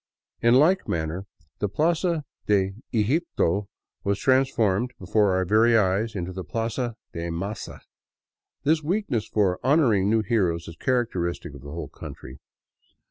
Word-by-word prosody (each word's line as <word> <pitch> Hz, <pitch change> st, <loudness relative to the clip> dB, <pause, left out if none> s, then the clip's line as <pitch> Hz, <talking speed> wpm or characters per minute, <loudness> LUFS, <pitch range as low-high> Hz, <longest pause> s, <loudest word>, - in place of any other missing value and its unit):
In 120 Hz, +1 st, +5 dB
like 170 Hz, +8 st, +4 dB
manner 85 Hz, +4 st, -2 dB, 0.3 s
the 105 Hz, -, 0 dB
Plaza 165 Hz, -, +1 dB, 0.2 s
de 95 Hz, -2 st, +2 dB, 0.2 s
Eglpto 105 Hz, -, +1 dB, 0.4 s
was 100 Hz, 0 st, +1 dB
transformed 125 Hz, -3 st, +2 dB
before 95 Hz, +1 st, +2 dB
our 95 Hz, 0 st, +1 dB
very 115 Hz, +4 st, +4 dB
eyes 105 Hz, +2 st, +1 dB
into 90 Hz, -1 st, -4 dB
the 95 Hz, 0 st, -5 dB
Plaza 115 Hz, +2 st, -2 dB, 0.2 s
de 85 Hz, +1 st, -4 dB
Maza. 95 Hz, +5 st, -5 dB, 0.8 s
This 155 Hz, +2 st, +3 dB
weakness 160 Hz, -, -1 dB
for 95 Hz, -4 st, +1 dB
honoring 125 Hz, -9 st, +3 dB
new 110 Hz, 0 st, +3 dB
heroes 90 Hz, -6 st, 0 dB
is 85 Hz, -, -8 dB
characteristic 90 Hz, -, -1 dB
of 70 Hz, -, -11 dB
the 70 Hz, -, -10 dB
whole 80 Hz, 0 st, -5 dB
country. -, -, -10 dB
105 Hz, 135 wpm, -25 LUFS, 95-125 Hz, 0.8 s, In